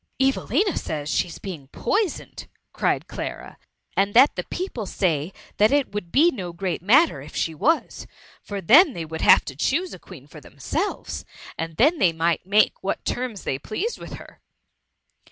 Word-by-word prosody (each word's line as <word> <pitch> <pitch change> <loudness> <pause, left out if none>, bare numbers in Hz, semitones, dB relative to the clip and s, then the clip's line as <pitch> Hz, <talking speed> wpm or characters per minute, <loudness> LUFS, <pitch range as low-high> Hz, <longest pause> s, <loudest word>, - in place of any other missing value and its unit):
'' - - -48
^' 265 - +5
Evelina 325 - 0
says 150 -1 -4
she^s 170 - -1
being 165 -9 -8
poisoned,^ 405 - -2 0.3
cried - - 0
Clara, - - -7 0.2
'* - - -41
and 200 +2 +1
that 260 +4 +6
the - - -4
people 300 - -5
say 165 -4 -1 0.3
that 215 +3 +4
it 285 -2 +1
would 205 -5 -5
be 325 +6 +5
no 185 - -6
great 175 0 -3
matter 235 - +4
if 145 - -12
she 165 - -1
was, 315 - 0 0.3
for 200 -1 -6
then 285 - +6
they 165 -5 -5
would 160 0 -6
have - - +6
to 135 - -7
choose 325 - 0
a - - -9
Queen 155 -8 -13
for 150 +1 -13
themselves, 220 - -4 0.3
and 165 -1 -5
they 270 - +4
might 165 +2 -1
make 210 +2 +3
what 195 - -3
terms 245 -5 -3
they 135 - -2
pleased 385 - -4
with - - -9
her." - - -12
200 Hz, 180 wpm, -23 LUFS, -, 0.3 s, that